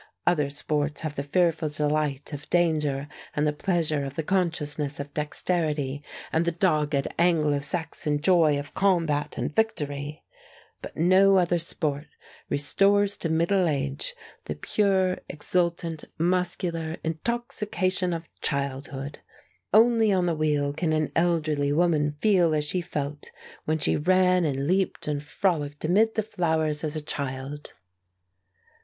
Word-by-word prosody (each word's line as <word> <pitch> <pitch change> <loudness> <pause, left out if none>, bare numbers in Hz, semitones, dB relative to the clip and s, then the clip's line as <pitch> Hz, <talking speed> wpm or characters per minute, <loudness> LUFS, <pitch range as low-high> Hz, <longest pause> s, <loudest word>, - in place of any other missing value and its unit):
Other 150 -5 +2
sports 145 +1 -2
have 155 -3 -3
the 140 - -3
fearful 165 +1 +1
delight 150 -1 -1
of 145 0 -8
danger 150 -5 +1 0.3
and 150 - +1
the 150 - +1
pleasure 155 -3 0
of 135 0 -6
the 160 - -2
consciousness 150 -5 -1
of 140 0 -6
dexterity 150 -2 -1 0.3
and 160 - +3
the 170 - 0
dogged 150 -5 +1
Anglo 155 -4 +3
Saxon 150 0 -2
joy 160 -2 +4
of 145 0 -6
combat 165 -6 +1
and - - -3
victory; 150 -8 -2 0.6
but - - -9
no 190 +3 +5
other 175 -1 +2
sport 150 -3 -3 0.4
restores 200 +7 +2
to 165 - -3
middle 170 +3 +2
age 140 - -2 0.3
the - - -4
pure, 190 -3 +1
exultant, 170 0 -1
muscular 170 -1 -1
intoxication 195 - -1
of 165 -1 -4
childhood. 140 0 -3 0.5
Only 225 0 +5
on 185 -2 +2
the 170 - +1
wheel 150 -2 0
can 160 +1 0
an 155 -1 0
elderly 155 -4 +1
woman 150 -2 +2
feel 180 -7 +4
as 150 -1 0
she 180 +4 -1
felt 145 -2 -5 0.4
when 155 +1 +1
she - - +1
ran 185 +2 +3
and 140 -2 -1
leaped 185 +1 0
and 145 -1 -1
frolicked 145 -1 -1
amid 215 +7 +3
the 220 - +1
flowers 160 -7 0
as 155 0 -2
a 155 - -2
child. 140 0 -5
155 Hz, 135 wpm, -26 LUFS, 145-180 Hz, 0.6 s, no